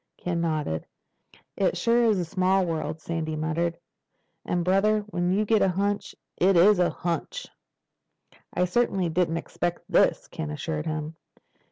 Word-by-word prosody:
Ken 170 -1 -2
nodded. 155 - -2 0.7
"It 195 - +1
sure 235 0 +3
is 215 -3 +3
a 180 - -1
small 185 +2 +2
world," 160 -1 -3
Sandy 160 -1 -3
muttered. 165 +2 -1 0.7
"And 175 -1 -1
brother, 205 +3 +3
when 180 -4 -2
you 205 +3 +2
get 220 +1 +3
a 195 - +4
hunch, 200 +3 -1 0.2
it 185 0 +4
is 195 +3 +6
a 180 - +3
hunch!" 170 -2 -3 1.1
"I 180 - +1
certainly 190 -2 +1
didn't 165 0 +1
expect 175 +1 -3
this," - - +2
Ken 160 -3 -5
assured 150 +1 -4
him. 155 0 -4
175 Hz, 150 wpm, -26 LUFS, 160-195 Hz, 1.1 s, is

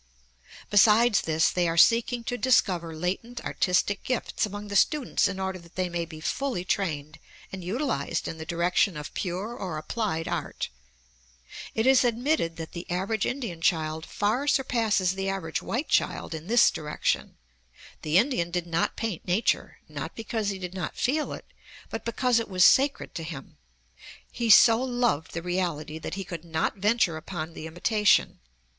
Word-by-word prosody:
Besides 215 +2 +5
this, 160 0 +2
they 175 -1 +1
are 165 0 -1
seeking 235 +5 +4
to 245 - -3
discover 185 -10 +2
latent 195 +9 -3
artistic 190 +2 +1
gifts 250 -3 -1
among 205 +1 -7
the 200 - -4
students 265 +1 +2
in 195 -1 -4
order 190 -1 -3
that 170 0 -18
they 185 -1 -1
may 170 -1 -2
be 160 -1 -10
fully 210 - -2
trained 155 -6 -2 0.3
and 190 -1 -7
utilized 185 - -2
in 160 - -6
the - - -4
direction 175 +1 +1
of 150 - -7
pure 195 +6 -3
or 185 -9 -5
applied 165 -1 -2
art. - - -3 1.1
It 220 - +1
is 265 -1 +6
admitted 240 - 0
that 165 -1 -7
the 170 0 -8
average 195 +4 -1
Indian 235 -11 -4
child 160 -1 0
far 225 +8 -1
surpasses 225 -9 +2
the 195 0 -2
average 185 -5 -3
white 265 +7 -3
child - - 0
in 160 +1 -7
this 235 +2 +5
direction. 150 -1 -2 0.6
The 155 +3 +2
Indian 205 -6 +2
did 175 0 -2
not 170 0 -1
paint 220 -7 -4
nature, 185 +6 0
not - - -6
because 220 -2 -2
he 195 - -3
did 180 -1 -6
not 180 -4 -5
feel 295 +4 0
it, - - -7 0.5
but - - -5
because 240 0 +2
it 230 - -5
was 185 -2 +3
sacred 275 +1 +3
to 165 - -5
him. 140 - -9 0.7
He 235 -2 -2
so 225 +2 +8
loved 245 - 0
the 170 - -4
reality 170 -4 -2
that 160 - -5
he 195 - -4
could 170 -3 -7
not 160 +4 -2
venture 205 -4 +2
upon 165 0 -6
the 160 - -7
imitation. 210 +6 +2
190 Hz, 170 wpm, -27 LUFS, 165-230 Hz, 1.1 s, so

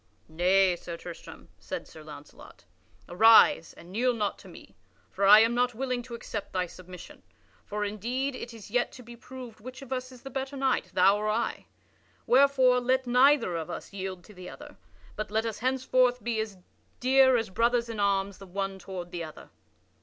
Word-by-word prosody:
"Nay, 180 +3 +3
Sir 170 0 -8
Tristram," 170 0 -11
said - - -6
Sir - - -13
Launcelot, - - -13 0.4
"arise, 215 -3 +6
and 175 - -15
kneel 245 +4 +1
not 210 -3 -2
to - - -14
me, 100 - -14 0.4
for 195 0 +1
I 210 +2 +9
am 230 +1 +3
not 245 0 +1
willing 255 0 -2
to 240 -1 -9
accept 210 -3 -7
thy 185 -1 0
submission, 180 0 -12 0.4
for 210 0 -3
indeed 245 +7 -3
it 240 - -7
is 220 -3 -12
yet 245 +1 +1
to 250 - -12
be 235 +1 -12
proved 250 -2 -11
which 255 +4 -10
of 265 -1 -6
us 255 0 -4
is 250 -2 -15
the 270 - -8
better 270 +2 -4
knight, 265 -1 0
thou 195 +2 +5
or 215 0 -2
I. 225 +2 -2 0.6
Wherefore 260 -1 +4
let 260 +1 +1
neither 250 -5 +4
of 160 -2 -4
us - - -8
yield 190 -2 -6
to 210 - -15
the 180 -1 -10
other, - - -12 0.4
but 215 - -4
let 220 +2 0
us 225 -2 -4
henceforth 255 0 +1
be 230 -2 -1
as 215 -3 -4 0.4
dear 260 0 +5
as 225 -4 -3
brothers 235 +3 +1
in 225 -2 -6
arms 200 -1 0
the 195 - -11
one 195 +1 -4
toward 180 -2 -8
the 170 -1 -4
other." 155 -1 -11
225 Hz, 190 wpm, -28 LUFS, 195-250 Hz, 0.6 s, I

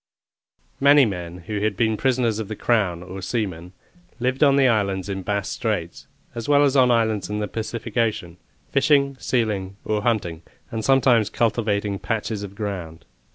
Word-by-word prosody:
Many 140 0 +6
men 90 -4 -5
who 105 +1 -3
had 105 -2 -1
been 110 -1 +2
prisoners 120 -3 +1
of 110 - -4
the 110 - -5
Crown, 100 -7 0
or 95 +2 -8
seamen, 95 -4 -3 0.5
lived 130 +3 +1
on 140 -2 +5
the 135 -1 +5
islands 100 -4 0
in 95 -1 -3
Bass' 100 0 -2
Straits, - - -3 0.3
as 115 +3 -6
well 145 0 +5
as 140 -1 +2
on 130 -2 +5
islands 110 -4 +1
in 105 - -2
the 105 0 -2
Pacific 110 0 -5
Ocean, 105 -7 -1 0.3
fishing, 140 0 +3
sealing, 100 -6 -1
or 105 -1 0
hunting, 100 -8 -1 0.3
and 110 -1 -3
sometimes 125 -5 +4
cultivating 105 -3 0
patches 110 -1 -3
of 100 -1 -8
ground. 90 -7 -5
110 Hz, 165 wpm, -23 LUFS, 100-120 Hz, 0.5 s, Many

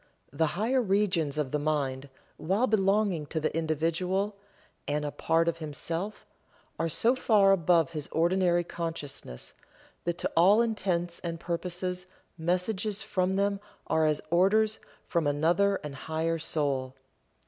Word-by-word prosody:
The 160 +3 +2
higher 245 +5 +2
regions 190 - +1
of 145 -4 -1
the 150 - 0
mind, 145 -3 -1 0.3
while 195 +9 +1
belonging 195 - +1
to 160 - -2
the 155 0 -2
individual, 165 +6 0 0.5
and 150 +1 -1
a 145 - -2
part 165 +2 +1
of 165 0 0
himself, 165 +6 -5 0.5
are 165 - 0
so 225 +10 +3
far 210 -6 +4
above 170 -3 +3
his 150 -3 -5
ordinary 175 +1 +2
consciousness 160 - -6 0.5
that 175 0 -1
to - - -2
all 190 +6 +6
intents 180 -6 -1
and 165 -1 -5
purposes 180 +2 -3 0.3
messages 185 +5 -1
from 185 -1 0
them 200 0 +1 0.3
are 160 -1 +2
as 150 -1 +1
orders 210 +5 +3 0.3
from 170 -4 0
another 170 +7 +2
and 150 -2 -6
higher 160 +4 -2
soul. 140 -5 -1
170 Hz, 135 wpm, -29 LUFS, 155-195 Hz, 0.5 s, all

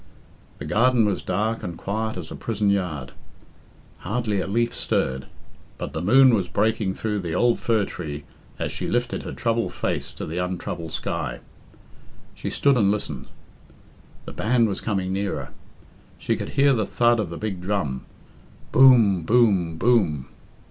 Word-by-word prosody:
The 75 - -7
garden 115 +7 +3
was 100 -2 0
dark 110 +5 -1
and 85 -2 -6
quiet 110 +1 -3
as 85 -3 -7
a - - -5
prison 105 -3 0
yard; 90 -9 -2 0.9
Hardly 105 0 -1
a - - -3
leaf 115 +4 0
stirred, 65 0 -1 0.5
but - - -5
the 80 - -3
moon 130 +7 +6
was 100 -5 +1
breaking 105 0 0
through 105 -2 -2
the 85 -3 -3
old 120 +5 +3
fir 110 -4 +1
tree 75 -5 -6 0.3
as - - -3
she - - -4
lifted 120 0 -1
her - - -6
troubled 115 0 -1
face - - -2
to - - -6
the 80 +3 -4
untroubled 90 -2 -4
sky. - - -3 0.9
She - - -5
stood 140 -2 +3
and 100 -4 +3
listened. 105 +1 -3 1.0
The - - -8
band 115 +1 +2
was 100 - -3
coming 95 -3 -1
nearer. 95 -9 -2 0.7
She - - -1
could - - -5
hear 140 0 +5
the 110 -5 0
thud 120 +1 +3
of 105 -6 -1
the 85 - -6
big 100 -4 -4
drum. 90 -9 -2 0.7
Boom! 120 -8 +6
Boom! 95 -5 +3
Boom! 85 - +2
100 Hz, 160 wpm, -24 LUFS, 90-115 Hz, 1.0 s, moon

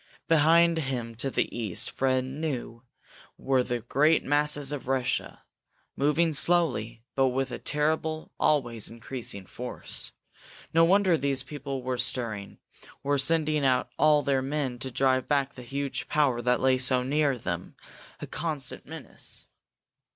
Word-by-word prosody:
Behind 165 +1 +5
him, 125 -5 -3
to 135 +3 -2
the - - -1
east, 110 -7 -2
Fred 130 -1 +1
knew 130 -4 -4 0.6
were 130 -1 +2
the 120 -1 -2
great 150 +7 +3
masses 145 0 +2
of 145 -4 -5
Russia, 130 -1 -1 0.5
moving 155 +3 +2
slowly, 130 -9 +1
but 135 -1 +3
with 130 +1 -1
a - - -5
terrible, 155 +1 -1
always 120 -7 +1
increasing 115 -4 -7
force. 125 +6 -5 0.6
No 165 +1 +6
wonder 185 -1 +4
these 135 -1 +1
people 135 -2 -5
were 125 -1 -2
stirring, 115 -5 -2 0.5
were 140 0 +1
sending 155 +1 +2
out 130 -2 +2
all 150 0 +5
their 135 -2 +1
men 135 -2 -2
to 130 - -4
drive 130 +1 +1
back 140 -2 +1
the 125 - -10
huge 140 +3 -4
power 140 -6 +2
that 125 +1 +2
lay 130 0 +3
so 130 0 +4
near 140 0 +1
them, 85 -6 -4 0.4
a - - -5
constant 150 -6 -4
menace! - - -8
135 Hz, 145 wpm, -28 LUFS, 125-150 Hz, 0.6 s, No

